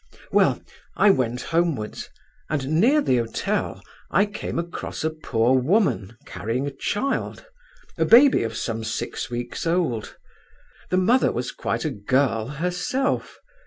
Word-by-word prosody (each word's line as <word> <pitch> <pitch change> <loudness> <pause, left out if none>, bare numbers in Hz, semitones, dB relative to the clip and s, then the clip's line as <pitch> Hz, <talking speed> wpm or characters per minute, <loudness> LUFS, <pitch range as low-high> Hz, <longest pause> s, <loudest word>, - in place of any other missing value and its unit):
"Well, - - +3 0.4
I 210 - +6
went 125 -6 0
homewards, 165 -10 -1 0.4
and 155 +2 0
near 285 +7 +5
the 130 - +2
hotel 115 -1 -2 0.3
I 200 - +3
came 205 -4 -5
across 170 -1 -4
a 160 - +1
poor 130 -5 +1
woman, 130 - +1
carrying 115 +6 -3
a 145 - -3
child—a 380 - -4
baby 260 +4 +7
of 115 -1 -3
some 115 -1 -3
six - - -4
weeks 120 +6 -4
old. 165 -11 -1 0.7
The 185 - +1
mother 235 +8 +3
was 125 +1 -3
quite 115 +1 -3
a 155 - 0
girl 115 0 0
herself. 180 - -2
150 Hz, 130 wpm, -24 LUFS, 120-185 Hz, 0.7 s, baby